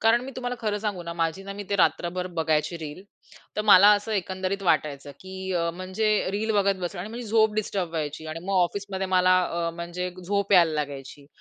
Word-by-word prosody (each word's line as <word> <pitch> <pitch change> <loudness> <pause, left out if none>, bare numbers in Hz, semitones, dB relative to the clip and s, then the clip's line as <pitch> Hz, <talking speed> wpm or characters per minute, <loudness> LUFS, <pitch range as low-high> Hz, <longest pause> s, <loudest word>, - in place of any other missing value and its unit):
कारण 225 +2 +4
मी 265 - -6
तुम्हाला 245 -1 -3
खरं 210 -2 -1
सांगू 205 -4 -3
ना, 170 0 -5
माझी 165 +2 -1
ना, 195 - -6
मी 205 +1 -6
ते 200 - +2
रात्रभर 180 -1 +1
बघायची 160 +1 +1
रील. 155 +2 -7 0.5
तर 210 - 0
मला 205 -1 +8
असं 205 +2 -3
एकंदरीत 190 0 -2
वाटायचं, 150 -5 0
की 190 0 -6
अ, 170 -1 0
म्हणजे 185 +4 -2 0.2
रील 210 +3 -1
बघत 200 -1 +3
बसणं 175 +1 -4
आणि 205 +4 -6
माझी 240 +2 -6
झोप 220 0 +3
डिस्टर्ब 200 -4 -1
व्हायची. 155 -1 -4
आणि 155 +1 -5
मग 195 - -1
ऑफिसमध्ये 190 +1 -2
मला 185 -1 +4 0.3
अ, - - -2
म्हणजे 175 +2 -4
झोप 200 +2 0
यायला 170 -4 +6
लागायची 145 -1 -5
185 Hz, 200 wpm, -26 LUFS, 170-205 Hz, 0.5 s, मला